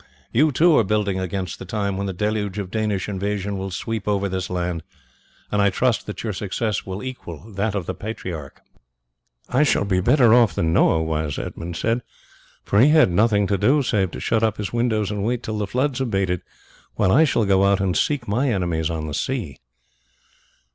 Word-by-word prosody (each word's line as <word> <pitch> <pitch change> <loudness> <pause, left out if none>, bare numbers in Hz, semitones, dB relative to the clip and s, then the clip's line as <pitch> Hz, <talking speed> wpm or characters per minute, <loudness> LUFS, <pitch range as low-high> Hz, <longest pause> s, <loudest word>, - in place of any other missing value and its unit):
You, 150 +6 +3
too, 160 +5 +4
are - - +4
building 100 -2 0
against 95 -1 -4
the - - -7
time 100 0 -2
when 100 +1 -2
the - - -2
deluge 105 +1 -2
of 95 -3 -4
Danish 105 -4 -1
invasion 100 0 -2
will 95 0 -4
sweep 110 +3 -4
over 100 -1 +1
this 95 0 -3
land, 90 -2 -2 0.7
and 105 - +2
I 100 - +4
trust 120 +3 0
that 105 - -6
your 110 -2 -2
success 105 +2 -2
will 95 +4 -5
equal 110 - -8
that 105 +2 -1
of 95 -4 -2
the - - -3
patriarch." 90 -9 -7 0.8
"I 130 - +1
shall 145 -8 +2
be 95 -2 +1
better 120 +2 +5
off 120 -4 +5
than 80 -1 +1
Noah 80 -1 +3
was," 80 -2 -2
Edmund 85 0 -5
said, 115 +5 0 0.6
"for 100 - +2
he 130 +6 +6
had 155 - +5
nothing 105 +2 +3
to 100 0 0
do, 145 +6 +3
save 100 -7 +1
to - - -8
shut 110 - 0
up 110 -1 +1
his 100 0 -4
windows 110 -4 0
and 105 -1 -2
wait 120 +2 -1
till 110 -1 -3
the 105 - -1
floods 130 +5 -1
abated, 95 -7 0 0.5
while 95 - +2
I 150 +10 +6
shall 120 -7 +2
go 95 -1 +3
out 100 0 +3
and 95 -2 0
seek 145 -5 0
my 125 +7 +1
enemies 85 -6 0
on 80 -2 -3
the 75 - -5
sea." 90 - -3
100 Hz, 200 wpm, -22 LUFS, 95-115 Hz, 0.8 s, he